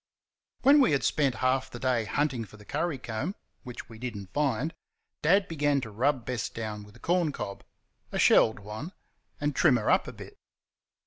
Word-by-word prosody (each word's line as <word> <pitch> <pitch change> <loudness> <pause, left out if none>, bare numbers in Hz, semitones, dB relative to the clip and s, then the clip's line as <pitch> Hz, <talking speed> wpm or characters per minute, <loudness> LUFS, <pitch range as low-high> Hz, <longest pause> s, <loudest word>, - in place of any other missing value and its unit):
When 280 +3 +7
we 250 - +4
had 140 - +1
spent 140 -5 +2
half 130 +1 +2
the - - -8
day 120 -2 +1
hunting 135 -1 0
for 110 0 -13
the 105 - -15
curry 170 +3 -1
comb, 130 - -4 0.3
which 125 -3 -8
we 115 -1 -12
did 120 -3 -4
n't 95 -2 -10
find, 150 +1 0 0.5
Dad 195 +5 +4
began 145 -3 +1
to 110 -3 -7
rub 125 +3 +1
Bess 125 -2 -2
down 110 -2 -5
with 105 +1 -16
a - - -16
corn 175 0 +1
cob 100 -7 -6 0.5
a - - -2
shelled 110 - +5
one 110 - -7 0.5
and 145 -1 -1
trim 145 -8 +5
her 105 - +1
up - - +3
a - - -5
bit. - - -12
130 Hz, 195 wpm, -28 LUFS, 110-150 Hz, 0.5 s, When